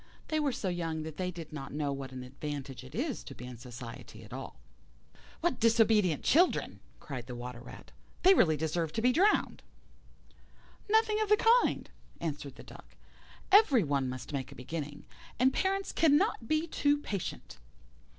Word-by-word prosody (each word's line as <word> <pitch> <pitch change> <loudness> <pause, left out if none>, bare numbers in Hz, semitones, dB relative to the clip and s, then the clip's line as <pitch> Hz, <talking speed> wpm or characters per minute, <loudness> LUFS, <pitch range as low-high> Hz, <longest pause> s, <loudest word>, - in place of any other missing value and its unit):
They 310 - +1
were 290 -2 +1
so 210 - -3
young 165 -3 -2
that 155 -1 -7
they 185 -1 -1
did 165 -3 -8
not 135 -3 -6
know 145 -2 -1
what 135 -1 -6
an 130 -1 -7
advantage 135 -1 -6
it 130 - -11
is 265 +3 -2
to 135 - -10
be 125 - -9
in 125 -2 -9
society 120 -1 -9
at - - -12
all. - - -7 0.9
"What 340 -6 0
disobedient 220 - +3
children!" 345 +6 +3 0.2
cried 130 -5 -7
the 125 - -6
old 120 - -7
Water 125 -1 -7
rat; 120 - -12 0.3
"they 380 +2 +8
really 160 - +4
deserve 160 +1 -1
to 225 - -1
be 250 - +5
drowned." 390 +10 +2 1.3
"Nothing 435 0 +3
of 430 - 0
the 420 - +6 0.2
kind," - - -1 0.3
answered 145 -4 -4
the - - -12
Duck, - - -14 0.6
"every 375 - +6
one 140 -3 0
must 130 +3 -7
make 135 -2 -3
a - - -11
beginning, 145 +3 -6 0.3
and 260 +1 +4
parents 390 +1 0
cannot 290 -7 +3
be 310 +4 +1
too 290 -3 +2
patient." 200 - -5
165 Hz, 175 wpm, -31 LUFS, -, 1.3 s, they